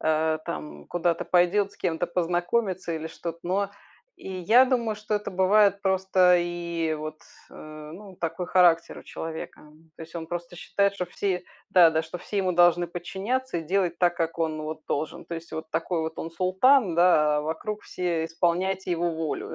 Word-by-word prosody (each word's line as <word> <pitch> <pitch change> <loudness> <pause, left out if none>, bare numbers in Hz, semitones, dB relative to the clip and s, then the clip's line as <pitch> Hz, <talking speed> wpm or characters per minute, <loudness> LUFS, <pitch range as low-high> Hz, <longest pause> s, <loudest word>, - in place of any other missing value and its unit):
а, 155 0 +1
там 75 - -7
куда-то 170 -1 0
пойдет 195 +3 +2
с - - -19
кем-то 170 +1 -1
познакомится, 180 +2 -1
или 160 0 -5
что-то. 170 0 -6
Но, 195 +3 -1 0.5
и - - -9
я 220 +8 +5
думаю, 235 -4 0
что 210 0 -3
это 205 -1 -5
бывает 200 +2 +4
просто 190 -1 +4
и 170 -2 -2
вот, 155 0 -6 0.3
э, - - -16 0.4
ну 200 0 -12
такой 165 +1 -3
характер 170 -2 +4
у - - -11
человека. 160 0 -7 0.3
То - - -9
есть 165 +2 -12
он 165 -1 -6
просто 175 0 -5
считает, 200 +3 0
что 180 - -2
все 180 +1 -2 0.3
да, 175 -3 +7
да 160 - +1
что 160 +2 -7
все 205 - -6
ему 185 -2 +1
должны 175 0 +4
подчиняться 195 +8 -3
и - - -5
делать 180 0 0
так, 175 -1 +2
как 165 -1 -2
он 155 -1 -1
вот 155 0 -6
должен. 150 +1 -3
То 170 - -6
есть 165 0 -8
вот 160 0 -6
такой 175 -3 -1
вот 160 0 -4
он 165 - -5
султан, 190 +4 +3
да 150 -4 +4
а - - 0
вокруг 165 +8 -4
все 170 -3 -2
исполняйте 180 +3 0
его 170 0 0
волю. 160 -1 -4
175 Hz, 185 wpm, -26 LUFS, 165-190 Hz, 0.5 s, да